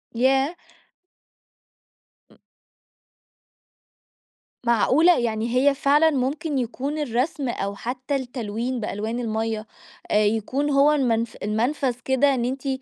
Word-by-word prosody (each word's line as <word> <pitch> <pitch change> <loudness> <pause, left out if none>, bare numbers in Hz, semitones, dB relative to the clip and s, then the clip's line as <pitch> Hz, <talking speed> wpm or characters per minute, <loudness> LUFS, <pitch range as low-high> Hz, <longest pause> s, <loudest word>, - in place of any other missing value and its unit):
ياه! 270 +6 +2 1.8
أ - - -23 2.3
معقولة! 275 +9 +4
يعني 230 0 -1
هي 275 +2 +4
فعلًا 295 +4 +4
ممكن 285 +2 -1
يكون 260 +4 -3
الرسم 270 0 -1
أو 200 -3 -3
حتى 255 +6 -4
التلوين 245 -1 -3
بألوان 220 +2 -3
المَيّة، 220 -1 -2 0.4
آآ 210 0 +4
يكون 225 +7 0
هو 280 +1 +4
المن 245 -6 +2 0.2
المنفذ 245 +5 0
كده 270 +1 +3
إن 240 -2 -1
أنتِ 265 +2 -4
255 Hz, 105 wpm, -23 LUFS, 225-280 Hz, 2.3 s, معقولة